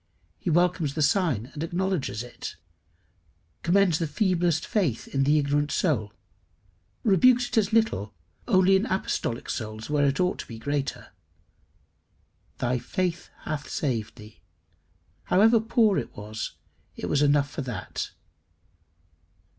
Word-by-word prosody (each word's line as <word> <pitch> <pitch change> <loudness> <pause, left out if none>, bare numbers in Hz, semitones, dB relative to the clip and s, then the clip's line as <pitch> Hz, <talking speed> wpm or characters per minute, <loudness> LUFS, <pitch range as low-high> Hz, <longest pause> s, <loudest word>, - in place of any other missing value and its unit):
He - - -3
welcomes 170 -3 +2
the 155 - +1
sign, 145 - +1
and 145 - -6
acknowledges 170 - -1
it; 120 - -8 1.1
commends 180 -2 +3
the 165 - 0
feeblest 175 0 +1
faith 165 - -1
in 135 0 0
the 150 +2 +4
ignorant 145 0 +1
soul, 115 - 0 0.9
rebukes 245 +4 +4
it - - -3
as 210 -1 0
little 220 - +1 0.3
only 190 -3 +5
in 200 +5 +1
apostolic 125 -10 -2
souls 110 +3 -5
where 145 -1 +3
it 135 0 0
ought 180 0 +1
to - - -6
be 115 - -8
greater. 145 +3 -3 1.5
"Thy 125 0 0
faith 175 +5 -2
hath 150 -2 -4
saved 120 -7 -2
thee." 105 -2 -14 0.8
However 220 +5 +5
poor 220 -2 +3
it - - -8
was, 105 +1 -5 0.4
it - - -5
was 145 - +1
enough 145 -1 +3
for - - -4
that. 125 -5 -5
150 Hz, 130 wpm, -26 LUFS, 130-190 Hz, 1.5 s, only